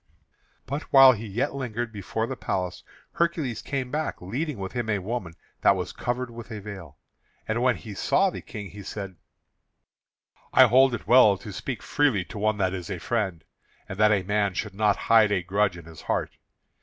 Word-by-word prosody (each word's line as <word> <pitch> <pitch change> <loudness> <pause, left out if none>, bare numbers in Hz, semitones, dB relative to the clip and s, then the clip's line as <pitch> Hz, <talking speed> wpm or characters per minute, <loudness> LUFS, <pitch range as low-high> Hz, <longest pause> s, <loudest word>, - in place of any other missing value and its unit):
But 140 +4 -3
while 135 -2 +9
he 115 -2 -4
yet 120 +8 -1
lingered 120 -3 -4
before 105 +2 -3
the 130 - -5
palace 90 -6 -3 0.3
Hercules 160 -9 -1
came 130 -3 -3
back, 155 +1 -2
leading 130 - -3
with 95 -1 -5
him 120 -2 -3
a 105 - +2
woman 95 -3 -4 0.3
that - - +5
was - - -4
covered 125 0 -3
with 115 0 -10
a 110 -2 -6
veil. 95 -8 -9 0.5
And 110 +2 -1
when 125 0 +3
he 110 -3 -9
saw 190 - +2
the - - -7
King, 105 -4 -8
he 100 - -9
said: 100 -1 -6 1.4
"I 130 - +8
hold 130 +1 +5
it - - -9
well 120 -6 +6
to 100 +1 -9
speak 125 +6 -5
freely 130 -11 +1
to 110 - -7
one 110 0 +1
that 95 -2 0
is 90 0 -5
a 95 - -3
friend, 95 -2 -2 0.4
and 95 - -7
that 105 0 +5
a 100 -3 +2
man 100 -1 0
should 110 0 -3
not 105 0 +2
hide 110 -2 +5
a 95 -3 +1
grudge 95 0 +1
in 85 - -11
his 80 -2 -12
heart. - - -1
110 Hz, 195 wpm, -26 LUFS, 95-125 Hz, 1.4 s, while